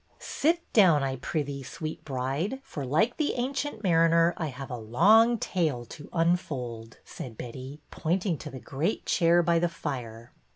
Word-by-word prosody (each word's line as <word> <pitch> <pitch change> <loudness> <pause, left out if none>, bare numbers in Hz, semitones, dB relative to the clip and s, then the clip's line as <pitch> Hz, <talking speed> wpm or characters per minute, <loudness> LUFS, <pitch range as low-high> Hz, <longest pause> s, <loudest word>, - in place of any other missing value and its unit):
Sit 335 +4 0
down, 175 -10 +6
I 135 -1 -2
prithee, 140 +1 -3
sweet 155 +4 -6
bride,, 140 - -2
for, 140 - -6
like 185 - +2
the 305 -2 0
Ancient 260 -1 -3
Mariner, 165 -1 +4
I 160 - -3
have 135 0 -7
a - - -2
long 205 - +5
tale 155 - -1
to 145 +5 -11
unfold," 130 -10 -1
said 115 -4 -8
Betty, 130 +4 -8
pointing 175 0 -1
to 150 - -7
the 130 - -8
great 150 - -2
chair 170 0 +4
by 170 0 +3
the 175 0 +1
fire. 120 -8 -6
155 Hz, 160 wpm, -28 LUFS, 130-180 Hz, -, down